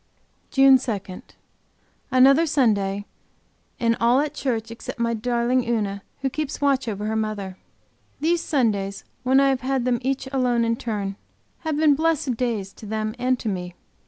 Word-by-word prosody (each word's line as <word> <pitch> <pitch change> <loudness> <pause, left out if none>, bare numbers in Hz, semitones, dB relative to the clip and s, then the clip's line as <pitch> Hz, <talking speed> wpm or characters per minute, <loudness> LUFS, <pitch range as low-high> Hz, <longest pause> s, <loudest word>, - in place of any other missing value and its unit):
JUNE 270 -1 +6
2 200 -7 -5 0.9
Another 275 +5 +5
Sunday, 205 -8 +1 0.7
and 230 -1 +2
all 240 +3 +4
at 295 0 -1
church 235 -6 -2
except 230 - -7
my 235 0 0
darling 240 +2 +1
Una 205 -4 -1 0.2
who 270 - 0
keeps 305 0 -3
watch 275 -3 +1
over 210 -1 -3
her 220 +1 -1
mother. 205 -4 -3 0.6
These 335 +2 +1
Sundays 205 -11 0 0.2
when 260 +1 +4
I 275 0 +4
have 265 -1 0
had 260 -1 -1
them 245 -2 +1
each 265 +1 -1
alone 250 -3 +1
in 230 0 +1
turn 205 -4 -4 0.4
have 315 -3 -2
been 305 -1 +5
blessed 310 -3 0
days 220 -5 -2
to 215 - -8
them 215 0 -2
and 255 +1 +1
to - - -5
me. 180 -3 -3
240 Hz, 160 wpm, -23 LUFS, 215-270 Hz, 0.9 s, JUNE